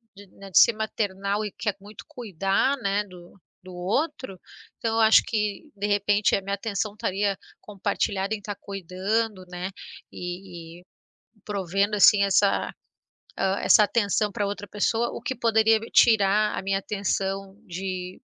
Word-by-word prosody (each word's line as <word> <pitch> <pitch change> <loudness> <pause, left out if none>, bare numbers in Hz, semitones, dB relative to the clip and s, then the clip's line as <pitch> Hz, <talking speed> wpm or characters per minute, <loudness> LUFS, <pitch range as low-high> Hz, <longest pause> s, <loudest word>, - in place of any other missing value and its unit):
de, 200 +1 -14
né, 195 0 -11
de 165 - +6
ser - - +6
maternal 205 -2 -2
e 210 - -5
quer 210 -4 -1
muito 205 +1 -12
cuidar, 205 - 0
né, 200 -4 0
do 180 0 -15 0.3
do 185 - -10
outro. 220 - -2 0.4
Então 225 -1 -2
eu - - +1
acho 220 0 +6
que, 210 +1 -2
de 205 +1 -2
repente, 205 0 +2
a - - -1
minha 200 +1 -3
atenção 205 0 -3
estaria 200 -1 -1 0.3
compartilhada 200 0 -2
em - - -8
estar 205 0 -6
cuidando, 195 +2 -2
né. 180 +1 -5 0.4
E 175 -2 -8
e - - -19 0.6
provendo 200 0 -1
assim 200 0 +6
essa, 200 0 +2 0.7
hã, 190 0 +1
essa 215 - +6
atenção 210 -1 +1
para 205 -1 -1
outra 205 0 -5
pessoa, 225 +4 0
o - - -6
que 260 - -3
poderia 220 -1 +3
tirar 210 -2 +4
a - - -4
minha 195 0 0
atenção 195 -1 -3
de 185 0 -5
200 Hz, 155 wpm, -25 LUFS, 190-215 Hz, 0.7 s, de